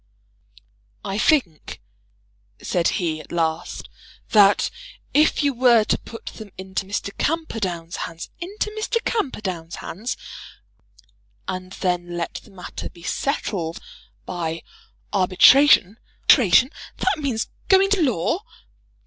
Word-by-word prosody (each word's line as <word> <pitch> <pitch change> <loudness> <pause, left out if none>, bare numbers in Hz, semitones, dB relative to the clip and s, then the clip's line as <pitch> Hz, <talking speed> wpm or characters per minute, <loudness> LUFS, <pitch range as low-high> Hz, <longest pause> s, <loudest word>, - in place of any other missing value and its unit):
"I 195 +2 -2
think," 205 - +1 0.8
said 175 -2 0
he, 160 -4 -1
at - - -16
last, 165 0 -2 0.4
"that 205 -2 +5 0.4
if 305 0 +3
you 285 -1 +2
were 240 -2 +5
to - - +1
put 230 - -11
them 220 -2 -8
into 190 0 -4
Mr. 200 0 -4
Camperdown's 195 - -2
hands 165 0 -6
" - - -40
"Into 410 +4 -3
Mr. 435 +2 -1
Camperdown's 195 - -2
hands!" 220 +8 -5 1.3
"And 185 0 -5
then 175 -2 -2
let 170 - -3
the - - -18
matter 185 -2 -7
be 170 - -16
settled 180 - -2 0.5
by 165 -2 -4 0.5
arbitration 200 +3 +6
" - - -37
"Arbitration? 255 - +6 0.3
That - - +1
means 250 -6 -1 0.2
going 390 +1 +5
to 405 -3 +3
law?" 245 - +1
195 Hz, 120 wpm, -22 LUFS, 175-275 Hz, 1.3 s, arbitration